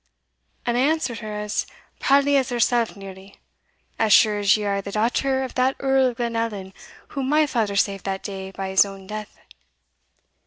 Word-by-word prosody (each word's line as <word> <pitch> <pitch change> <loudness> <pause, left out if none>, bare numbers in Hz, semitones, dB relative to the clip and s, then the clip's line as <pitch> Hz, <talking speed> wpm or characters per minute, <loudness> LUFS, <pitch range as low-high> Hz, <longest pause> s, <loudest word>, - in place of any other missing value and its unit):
And 240 0 0
I - - +3
answered 290 -4 0
her 215 -2 -6
as 210 0 -3 0.3
proudly 280 +1 +3
as 270 -1 +2
hersell 240 -1 +2
nearly 195 0 -11 0.6
As 220 -1 +2
sure 210 0 +5
as 205 +1 +4
you 210 - -4
are 200 -1 0
the 200 - -7
daughter 265 +5 0
of 260 - -6
that 260 +1 +1
Earl 270 -1 +3
of 245 -1 -4
Glenallan 230 -5 -3 0.4
whom 270 -1 -3
my 305 +1 +4
father 225 -7 -1
saved 200 -1 0
that 195 -1 -3
day 190 -2 -6
by 190 0 -5
his 190 0 +5
own 195 -1 -9
death. 210 +1 -7
215 Hz, 180 wpm, -23 LUFS, 200-260 Hz, 0.6 s, sure